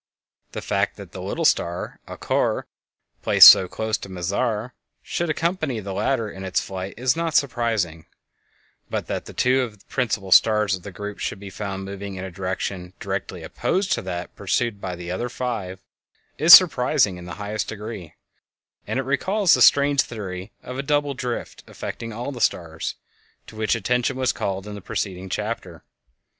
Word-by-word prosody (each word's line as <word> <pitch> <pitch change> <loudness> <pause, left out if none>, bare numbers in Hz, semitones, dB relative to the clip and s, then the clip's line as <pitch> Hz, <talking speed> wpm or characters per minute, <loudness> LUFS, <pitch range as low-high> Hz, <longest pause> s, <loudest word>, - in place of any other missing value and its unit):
The - - -5
fact - - 0
that - - -10
the - - -8
little - - -2
star 85 +1 0
Alcor - - -1 0.6
placed - - +10
so 95 - +7
close 110 +3 -2
to - - -9
Mizar 105 +6 -2 0.3
should 170 -1 -2
accompany 160 -5 -1
the 100 -2 -6
latter 115 +3 0
in 95 -2 -8
its 95 -1 0
flight 95 0 -6
is 125 +1 +2
not 165 -2 -2
surprising, 110 - 0 0.8
but - - -2
that - - -4
two 130 +1 +3
of 115 -4 -4
the - - -25
principal 110 -7 -2
stars 105 0 +5
of 95 - -3
the 100 - -9
group 105 +2 -7
should - - -3
be 100 -1 -9
found 95 -1 -5
moving 100 0 -6
in 95 - -6
a 95 - -7
direction 95 0 -4
directly - - -4
opposed 190 +1 -1
to - - +1
that 90 -1 -6
pursued 100 +1 -1
by 90 -1 -4
the 85 0 -7
other 120 +7 -2
five 110 -8 -4 0.6
is 160 +4 +5
surprising 135 - +7
in 90 - -10
the 90 - -7
highest 105 0 -3
degree; 105 -5 -7 0.7
and - - -2
it 135 - 0
recalls 185 +8 +2
the - - +3
strange 140 -1 +6
theory 95 -5 -6
of 125 +1 -6
a - - +1
double 145 0 0
drift 125 -3 -5
affecting 115 0 -6
all 120 +5 -5
the 125 -4 -7
stars, 80 -6 -1 0.5
to - - -13
which 110 +1 +1
attention 125 +4 0
was 130 -1 +2
called 95 0 -3
in 105 - -7
the 100 - -8
preceding 95 0 -4
chapter. 100 -5 -4
105 Hz, 175 wpm, -23 LUFS, 95-125 Hz, 0.8 s, placed